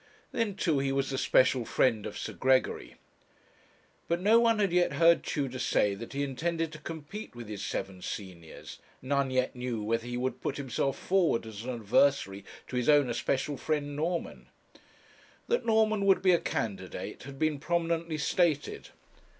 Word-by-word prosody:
Then, 230 -6 -1
too, 160 -7 +1
he 135 0 0
was 135 0 0
the 135 - -2
special 130 -1 +3
friend 115 -2 +1
of - - -7
Sir - - -5
Gregory. 130 0 +1 1.1
But 170 +1 0
no 215 +5 +5
one 230 -1 +3
had 200 -4 +1
yet 175 -4 +3
heard 165 +3 +5
Tudor 135 -4 -3
say 105 -4 +2
that 115 +6 -8
he 140 +1 -1
intended 165 +4 -2
to 155 - -9
compete 165 - -8
with 120 -2 -8
his 105 -2 -6
seven 95 -1 -4
seniors 90 -6 -8 0.2
none 140 0 0
yet 130 0 0
knew 125 -3 -3
whether 115 +2 -1
he 120 0 -3
would 130 +1 -2
put 135 - -2
himself 135 0 -1
forward 180 -12 +1
as 110 0 -8
an - - -4
adversary 110 -2 +2 0.3
to 125 - -3
his 125 +3 +1
own 145 -4 +5
especial 135 +4 -1
friend, 145 -1 -2
Norman. 165 +3 -3 1.0
That 475 - 0
Norman 220 -2 +3
would 195 - +4
be 185 - +6
a 170 - +4
candidate 95 -5 -4
had 135 +1 -9
been 155 -1 0
prominently 165 0 -1
stated. 155 -1 0
140 Hz, 170 wpm, -29 LUFS, 120-170 Hz, 1.1 s, be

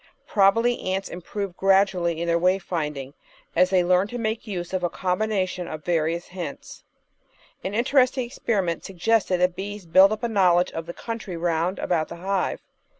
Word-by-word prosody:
Probably 230 +4 +3
ants 190 +1 -2
improve 185 +1 -5
gradually 190 -4 +2
in 170 - -2
their 170 0 +2
way 185 +2 +3
finding 150 -7 -4 0.4
as 180 0 +4
they 185 -2 +3
learn 180 +2 +3
to 245 - -6
make 225 0 -3
use 180 -3 -5
of 185 -1 -1
a 175 - +1
combination 185 -1 -1
of 155 0 -6
the 175 - -2
various 165 +1 0
hints. 175 -6 -7 0.8
An 195 +2 -3
interesting 255 +1 +2
experiment 200 - -2
suggested 195 0 +1
that 180 0 +2
bees 205 0 -6
build 190 +4 +6
up 215 +2 -3
a - - +2
knowledge 180 -5 +3
of 165 0 -6
the 170 - -5
country 225 -6 -6
round 170 +2 0
about 160 -3 0
the - - -8
hive. 190 +2 -2
185 Hz, 175 wpm, -24 LUFS, 170-205 Hz, 0.8 s, build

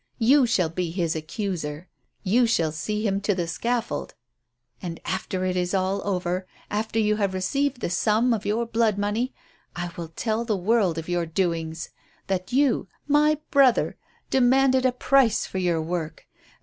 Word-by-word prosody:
You 260 +2 +5
shall 180 -7 +2
be 175 +1 -2
his 170 -2 -1
accuser; 160 -1 -4 0.4
you 230 +5 +3
shall 165 -8 +1
see 210 +8 -3
him 200 -1 0
to 205 -1 +1
the 175 -2 -1
scaffold. 235 +7 -2 0.7
And 170 -3 -5
after 185 +1 -2
it 185 -1 0
is 180 +1 0
over, 185 -1 -1 0.2
after 220 +2 -2
you 210 -1 +2
have 200 -3 0
received 275 +7 -1
the - - -1
sum 220 +6 +2
of 215 -2 -2
your 220 +3 0
blood 225 -2 +1
money, 210 +5 -1 0.4
I 175 0 -4
will 170 -1 -5
tell 220 +8 -2
the 220 -4 -1
world 190 -3 +2
of 165 - -5
your 175 -1 -1
doings. 165 -2 -2 0.3
That 190 +2 -2
you 260 -6 +2 0.2
my 300 +1 +4
brother 275 -4 +4 0.4
demanded 260 0 +4
a - - +2
price 250 -2 +3
for 190 - -4
your 170 -3 +1
work. 160 -1 -4
200 Hz, 160 wpm, -25 LUFS, 175-235 Hz, 0.7 s, You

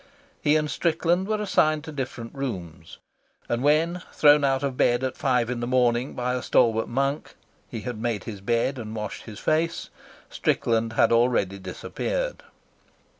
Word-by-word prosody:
He 150 0 +3
and 155 -1 +1
Strickland 170 +4 0
were 215 0 0
assigned 155 -7 +2
to 160 - -7
different 130 -5 -5
rooms, 90 - -6 0.5
and 120 0 -1
when, 160 +5 +2
thrown 145 -1 +5
out 135 0 +1
of 135 -2 -1
bed 120 0 +2
at 130 -1 -2
five 125 -3 +1
in 125 -1 -3
the 120 - -3
morning 125 0 +1
by 125 0 -1
a 125 - -2
stalwart 115 -3 +2
monk, 135 +4 -2 0.3
he 115 - -5
had 120 -1 -5
made 115 -4 -1
his 105 -4 -7
bed 120 +5 0
and 110 -1 -6
washed 105 -1 -5
his 110 -3 -9
face, 160 +7 -1 0.4
Strickland 115 -1 0
had - - +3
already 115 -5 +2
disappeared. - - -4
125 Hz, 165 wpm, -25 LUFS, 115-150 Hz, 0.5 s, thrown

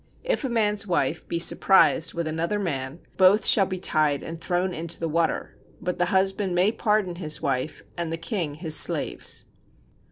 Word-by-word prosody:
If - - -1
a 265 - -2
man's 210 -3 0
wife 175 - -1
be 170 - -2
surprised 170 -1 +4
with 170 -1 -3
another 165 +6 -2
man, 145 -5 -4 0.2
both 190 +3 +4
shall 195 -3 +5
be 185 - -4
tied 155 -5 +1
and 165 0 -8
thrown 180 +1 -1
into 165 +1 -5
the 165 - -2
water, 165 +1 -1 0.2
but 180 0 -4
the 175 - +2
husband 190 -1 0
may 185 +4 +3
pardon 210 -6 -1
his 155 -4 -3
wife 135 +2 -3
and 170 -1 -3
the 165 - -2
king 165 -3 -3
his 155 0 -1
slaves. - - +1
175 Hz, 180 wpm, -24 LUFS, 160-195 Hz, 0.2 s, shall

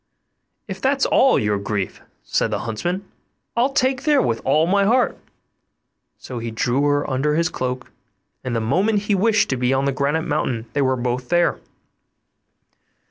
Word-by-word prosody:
'If 190 -2 -7
that's 270 +1 +2
all 265 - +4
your 105 -1 0
grief,' 100 -2 -3 0.2
said - - 0
the 105 -1 -2
huntsman, 175 - -3 0.5
'I'll 245 +4 +2
take 260 -1 +2
you 275 - -14
there 295 -2 +5
with 115 -1 -1
all 150 +4 +3
my 200 +3 +2
heart'; 245 +5 +2 1.0
so 125 -2 -7
he 115 0 -4
drew 120 +4 0
her 145 0 +1
under 145 +3 0
his 170 +2 +1
cloak, 125 -5 -4 0.5
and 125 -2 -3
the 115 - 0
moment 195 - +1
he 205 - 0
wished 210 +2 +3
to 130 - 0
be 125 +2 +1
on 135 +1 0
the 140 - +1
granite 140 +4 0
mountain 125 -7 -2
they 145 - +1
were 130 -1 +2
both 125 0 -3
there. 175 0 +2
140 Hz, 175 wpm, -21 LUFS, 125-200 Hz, 1.0 s, there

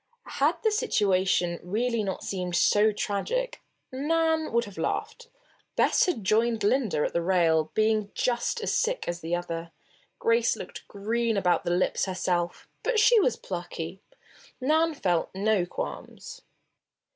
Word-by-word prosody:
Had - - +4
the 440 - +3
situation 190 - +1
really 230 +5 -1
not 190 -2 -4
seemed 180 -2 -3
so 210 +4 +4
tragic, 475 - -2 0.3
Nan 320 +3 0
would 235 0 +1
have 205 -1 -10
laughed. 485 0 -3 0.5
Bess - - +3
had 245 - -1
joined 225 +3 +2
Linda 210 - +1
at - - -3
the 170 - +1
rail, 165 -3 +2
being 215 -1 +2
just 250 - 0
as - - 0
sick - - 0
as 175 0 -3
the 165 +2 -1
other. 170 -1 -5 0.5
Grace 465 -1 +2
looked - - -9
green 225 +2 -1
about 180 -3 +1
the - - 0
lips, 175 +1 +1
herself; 180 -2 -2
but - - +1
she 450 +2 +6
was 255 - +2
plucky. 175 0 -6 0.6
Nan 315 +4 +2
felt 175 - 0
no 200 -2 +1
qualms. 470 - -7
215 Hz, 145 wpm, -27 LUFS, -, 0.6 s, she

